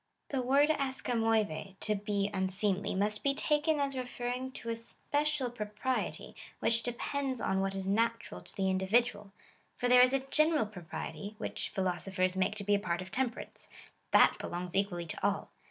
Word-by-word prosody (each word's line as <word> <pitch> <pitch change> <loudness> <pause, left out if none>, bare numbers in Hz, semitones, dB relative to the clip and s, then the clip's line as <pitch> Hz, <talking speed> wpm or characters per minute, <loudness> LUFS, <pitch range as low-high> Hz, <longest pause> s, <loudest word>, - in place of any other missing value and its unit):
/^The 260 -2 +1
word 280 +4 +4
da'xrjfjLovelv 225 - 0
(to 215 - +1
be 205 -1 -1
unseemly) 190 +1 0
must 210 +2 +1
be 275 0 +2
taken 300 +1 +2
as 275 -1 0
re 255 - -1
ferring 250 +1 -4
to 230 - -3
a - - -1
special 285 +3 -1
propriety, 230 +3 -3 0.2
which 230 0 +2
depends 260 +2 -1
on 190 0 +1
what 195 0 -1
is 190 -1 -3
natural 230 +3 0
to - - -14
the 195 -2 0
individual; 205 +2 +1 0.5
for 245 - 0
there 250 0 +7
is 250 +1 +6
a 270 - +2
general 305 -4 +3
propriety, 200 +1 -7
which - - -3
j)hilo 185 -3 0
sophers 185 -1 0
make 190 +2 +1
to 210 - -3
be 205 +1 +2
a 200 - +4
part 175 -3 -2
of 185 - -13
temperance. 250 -2 -3 0.4
That - - +6
belongs 175 0 -4
equal 195 -2 +1
ly 170 - -3
to 160 - -7
all. - - 0
220 Hz, 180 wpm, -32 LUFS, 195-255 Hz, 0.5 s, there